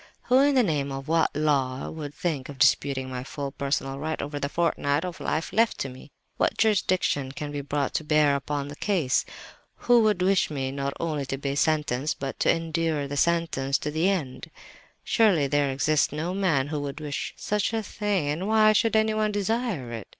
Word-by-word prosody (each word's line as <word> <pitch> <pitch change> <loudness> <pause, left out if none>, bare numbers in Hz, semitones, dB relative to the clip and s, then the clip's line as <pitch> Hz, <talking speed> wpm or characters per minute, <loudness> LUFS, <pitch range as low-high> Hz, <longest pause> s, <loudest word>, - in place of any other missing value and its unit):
"Who, 255 +1 +4
in 285 0 +4
the 255 - +5
name 145 -7 -1
of 135 +1 -6
what 165 0 +3
Law, 135 -4 0
would 150 -2 -7
think 160 -8 -3
of 140 - -8
disputing 135 -1 +2
my 125 -1 -5
full 140 +1 -5
personal 135 -1 -2
right 160 +2 -3
over 145 0 -4
the 140 - -2
fortnight 155 -1 0
of 180 0 -6
life 160 +4 -2
left 225 +2 +2
to 135 - -2
me? 130 +3 -12 0.3
What - - +1
jurisdiction 185 -10 +1
can 145 +1 -5
be 145 -1 -3
brought 140 0 -2
to - - -1
bear 150 -2 +3
upon 140 0 -3
the 145 - -8
case? 165 -8 +1 0.5
Who 240 -1 +4
would 210 -4 +2
wish 190 0 +3
me, 135 -3 -3
not 140 0 -3
only 150 -5 -2
to 135 - -3
be 140 0 -3
sentenced, 150 -2 0
but 135 0 -5
to - - +2
endure 165 -3 -1
the 145 - -5
sentence 155 -4 +1
to 150 - -4
the 160 +5 +2
end? 145 -6 -3 0.5
Surely 200 -10 +3
there 145 +1 +1
exists 140 +3 +1
no 160 +5 -3
man 165 -8 +1
who 150 -1 -2
would 145 +1 -5
wish 145 -2 -4
such 210 0 -1
a 225 -1 -1
thing—why 205 +2 +1
should 225 +2 +2
anyone 215 -1 +2
desire 205 - -2
it? 115 -3 -6
150 Hz, 195 wpm, -26 LUFS, 140-185 Hz, 0.5 s, the